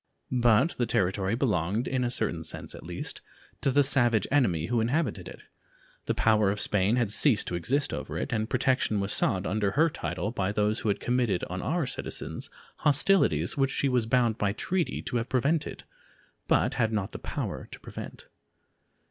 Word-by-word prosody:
But 120 +4 +4
the 120 - +1
territory 95 +1 +1
belonged, 110 - 0
in 130 -1 0
a 120 - 0
certain 105 -9 -1
sense 80 - -8
at - - -10
least, - - -6 0.4
to 135 - +2
the 145 +2 +4
savage 120 -6 +3
enemy 95 - +2
who 120 +2 0
inhabited 125 +2 -1
it; - - -10 0.7
the - - 0
power 110 -2 +3
of 105 +1 -1
Spain 105 +2 +2
had 120 -5 0
ceased 110 +1 +3
to - - -5
exist 130 - 0
over - - -4
it, 135 - -3
and 110 0 -1
protection 130 -4 +1
was 100 0 -1
sought 95 0 +1
under 100 0 0
her 160 +2 +3
title 110 -9 -3
by 100 -4 -1
those 105 +2 0
who 110 - -1
had 100 - 0
committed 120 -6 0
on 90 0 -3
our 170 -2 0
citizens - - -5 0.3
hostilities 145 - +2
which 135 -1 +2
she 135 0 0
was 125 -3 +1
bound 115 -2 +2
by 100 -1 +1
treaty 180 - -2
to 120 - -2
have 115 +2 -3
prevented, 145 +5 0 0.6
but - - +2
had 115 -3 +1
not 105 -3 -2
the - - -7
power - - -4
to - - -10
prevent. - - -9
115 Hz, 185 wpm, -28 LUFS, 105-130 Hz, 0.7 s, But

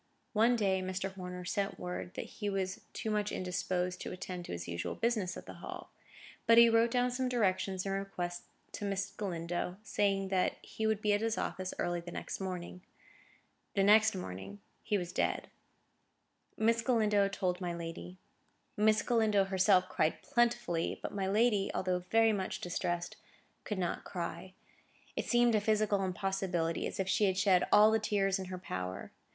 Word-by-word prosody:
One 230 +3 +4
day, 195 -4 +1
Mr. 190 +1 -3
Horner 180 -1 -7
sent 195 +2 -1
word 180 0 -5
that - - -4
he 205 -2 -4
was 190 -1 -2
too 220 - -3
much 210 -1 0
indisposed 180 0 -2
to - - -5
attend 180 -1 -6
to - - -7
his 85 0 -5
usual 85 0 -3
business 215 -6 0
at - - -9
the - - -9
Hall; - - -8 0.6
but 230 - +7
he 235 0 +9
wrote 230 +1 +4
down 250 +1 +1
some 255 +1 -1
directions 190 -5 0
and 195 - -1
requests 180 -3 -4 0.2
to - - -6
Miss 195 0 -2
Galindo, 175 -2 -3
saying 195 -3 0
that 185 -1 +1
he 220 - -3
would 215 -1 0
be 210 -1 +3
at 205 - +1
his 225 0 0
office 185 0 -3
early 175 0 -1
the 170 +1 -8
next - - -5
morning. 180 -1 -5 0.9
The 195 - +3
next 215 +1 +6
morning 95 - -6 0.2
he 210 - 0
was 180 -2 -5
dead. - - 0 1.1
Miss 230 +1 +3
Galindo 215 -4 +3
told 185 -2 -2
my 175 -1 -2
lady. 165 - -7 0.6
Miss 215 +1 +3
Galindo 220 -4 +3
herself 190 -1 +3
cried 155 - 0
plentifully, 235 -10 +1
but - - -5
my 195 -2 -1
lady, 210 0 +3
although 185 -1 0
very 225 -1 +5
much 190 -2 -2
distressed, 175 0 -3 0.5
could 210 - -3
not 180 -2 -2
cry. 185 +1 -5 0.6
It - - -2
seemed 240 -1 +4
a 215 - +3
physical 210 -2 +2
impossibility, 185 -3 -1
as - - -7
if 190 - 0
she 205 +2 +3
had 190 -1 +1
shed 190 -2 +4
all 215 +1 +7
the 220 - +3
tears 195 -2 +1
in 190 - -4
her 185 0 -6
power. 95 - -5
195 Hz, 175 wpm, -33 LUFS, 180-215 Hz, 1.1 s, he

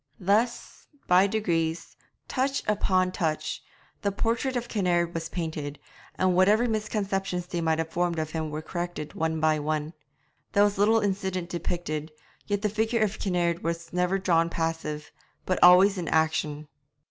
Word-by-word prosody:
Thus, 215 +5 0 0.2
by 180 +2 +5
degrees, 170 -6 -1 0.3
touch 270 +1 -1
upon 185 -3 +2
touch, 155 -4 -2 0.4
the 200 - 0
portrait 230 +6 -1
of 240 -1 -2
Kinnaird 175 -6 +1
was 165 0 -4
painted, 155 -4 -4 0.4
and 185 -1 +2
whatever 210 +6 +4
misconceptions 195 -4 -2
they 175 -1 -3
might 160 0 0
form 175 -1 0
of 155 -1 -2
him 160 -1 -3
were 155 +1 -5
corrected 175 -3 -5
one 160 0 -1
by 155 -1 +2
one. 155 +1 -2 0.6
There 200 - +5
was 205 -1 +1
little 220 +2 +4
incident 190 -3 -2
depicted, 165 -3 -3 0.4
yet 205 0 -1
the - - +3
figure 220 +2 +1
of 215 0 -2
Kinnaird 175 -3 0
was 170 0 -3
never 180 +2 +1
drawn 170 -3 +2
passive, 160 -2 -3 0.3
but 185 - -1
always 185 +2 +7
in 170 - -4
action. 155 -1 0
175 Hz, 150 wpm, -27 LUFS, 160-200 Hz, 0.6 s, always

